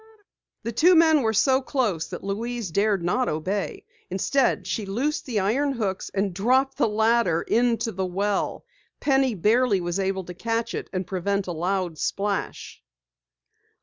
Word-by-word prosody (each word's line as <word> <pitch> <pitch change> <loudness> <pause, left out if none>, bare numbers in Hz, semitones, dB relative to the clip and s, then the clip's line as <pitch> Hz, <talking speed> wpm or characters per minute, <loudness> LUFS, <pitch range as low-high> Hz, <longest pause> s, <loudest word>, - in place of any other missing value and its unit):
The 230 - -3
two 345 +10 +5
men 320 -2 +5
were 220 -3 +1
so 260 +5 +3
close 220 - -1
that - - -8
Louise 220 0 -3
dared 200 0 +1
not 250 +9 +1
obey. 185 +6 -3 0.2
Instead 195 +2 +1
she 195 +3 -3
loosed 265 +12 -2
the 230 -5 0
iron 265 +9 +1
hooks 200 -6 -3
and 195 -1 0
dropped 260 +8 +1
the - - +3
ladder 220 -5 +2
into 235 -1 +1
the 190 -1 -2
well. 200 - -2 0.3
Penny 270 -4 +2
barely 215 +2 +3
was 175 +1 -2
able 190 0 -1
to 180 - -8
catch 230 +4 -2
it - - -5
and 185 -1 -3
prevent 195 +2 -1
a 180 - -4
loud 175 -1 -2
splash. 200 0 -3
205 Hz, 155 wpm, -25 LUFS, 190-245 Hz, 0.3 s, two